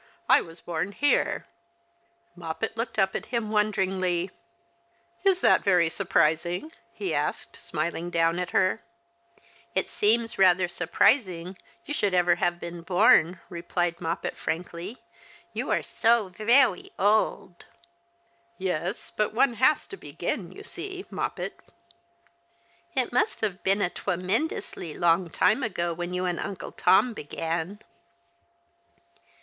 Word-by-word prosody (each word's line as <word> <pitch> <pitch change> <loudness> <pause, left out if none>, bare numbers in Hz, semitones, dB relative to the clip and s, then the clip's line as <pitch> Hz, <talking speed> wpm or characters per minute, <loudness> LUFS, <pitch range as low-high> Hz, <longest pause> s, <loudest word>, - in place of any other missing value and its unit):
I - - +6
was 165 0 -11
born 175 +3 -3
here." 290 +5 +1 0.9
Moppet 175 +6 -4
looked 230 0 -4
up 190 -2 +3
at - - -4
him 230 -3 -2
wonderingly. 190 -4 0 0.9
"Is 380 -2 +3
that - - +4
yery 175 -4 +3
surprising? 175 - +1
" - - -38
he 390 - -3
asked, - - -2
smiling 170 +2 -3
down 165 0 +1
at 180 -1 -2
her. 185 +4 +2 0.5
" 345 +2 -31
It - - +1
seems 225 +1 +1
rather 185 -1 +5
surprising 180 - +1 0.3
you 295 - -4
should 200 -9 +1
ever 175 -1 +4
have 175 0 0
been 170 0 -7
born," 175 -1 +4
replied 175 0 -2
Moppet, 165 0 -3
frankly; 175 +6 -5 0.2
" - - -25
you - - -3
are - - +1
so 230 -3 +2
veicay 215 +1 +3
old." 205 -3 +1 0.5
" 240 - -40
Yes, 185 -4 -3
but 215 0 0
one 245 +1 +3
has 260 +6 +3
to 390 - -10
begin, - - -4
you - - -11
see, 380 -1 -6
Moppet." - - -4 0.7
'' - - -38
It - - +1
must 440 0 +1
have 200 -4 -1
been 195 +1 +2
a - - +1
twemendously 185 - -2
long 170 +1 +3
time 215 - +2
ago 175 -7 -1
when 175 +1 -5
you 180 0 -1
and 175 -1 -1
Uncle 195 - -5
Tom 205 +7 +3
began." 165 +4 -4
185 Hz, 135 wpm, -26 LUFS, 175-220 Hz, 0.9 s, I